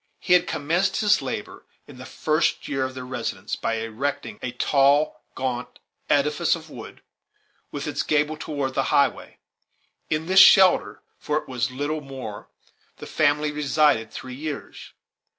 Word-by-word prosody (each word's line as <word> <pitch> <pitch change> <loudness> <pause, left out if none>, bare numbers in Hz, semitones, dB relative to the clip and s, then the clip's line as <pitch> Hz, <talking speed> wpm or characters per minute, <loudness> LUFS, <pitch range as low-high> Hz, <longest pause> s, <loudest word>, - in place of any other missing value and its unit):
He 180 - +1
had 180 0 +4
commenced 175 +6 0
his 205 -6 +3
labors, 130 -6 -6 0.2
in 125 - -14
the 130 - -9
first 155 +1 0
year 135 -2 -1
of 130 0 -6
their 130 0 -7
residence, 115 -5 -4
by 115 - -2
erecting 115 +1 -4
a 125 - -3
tall, 140 +4 +2
gaunt 125 -2 -4 0.3
edifice 150 +5 +2
of 160 -2 -12
wood, - - -11 0.7
with - - -5
its - - -2
gable 150 +1 +1
toward 145 -4 -4
the - - 0
highway. - - +1 0.7
In 155 +1 -1
this 190 +2 +5
shelter 190 -1 +6 0.2
for 150 - -1
it - - -5
was 125 -1 -2
little 145 +4 -3
more, 130 -7 -8 0.5
the - - -9
family 150 0 +1
resided 145 -5 +2
three 125 +3 -8
years. 145 +2 -7
145 Hz, 150 wpm, -24 LUFS, 130-155 Hz, 0.7 s, shelter